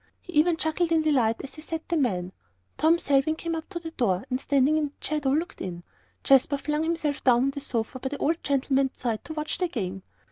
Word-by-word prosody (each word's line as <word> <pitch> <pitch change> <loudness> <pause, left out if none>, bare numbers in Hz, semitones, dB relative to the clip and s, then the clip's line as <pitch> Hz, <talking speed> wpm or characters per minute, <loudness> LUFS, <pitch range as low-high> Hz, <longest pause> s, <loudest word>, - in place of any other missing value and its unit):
He 360 - -12
even 320 +2 +4
chuckled 320 +2 0
in 320 -1 +3
delight 245 -7 +2
as 275 - -8
he 310 - -10
set 320 +1 -5
the 340 - 0
men. 185 - 0 0.4
Tom 325 +2 +4
Selwyn 285 -1 +2
came 335 +1 -4
up 320 -1 -5
to 380 - -5
the 330 -1 -6
door, 200 - 0
and 255 +1 0
standing 285 +2 +3
in 300 - 0
its 285 - -6
shadow, 300 -3 0
looked 315 +6 -1
in. 175 -2 -5 0.4
Jasper 275 +1 +4
flung 300 +2 -1
himself 320 -3 -1
down 245 -1 +5
on 275 - +2
the 285 - -6
sofa 245 -2 -3
by 265 - -3
the 285 - -4
old 325 +4 0
gentleman's 275 -1 +1
side 230 -3 -2
to 315 - -6
watch 305 0 -3
the 365 - +1
game. 195 - -4
285 Hz, 235 wpm, -26 LUFS, 255-320 Hz, 0.4 s, down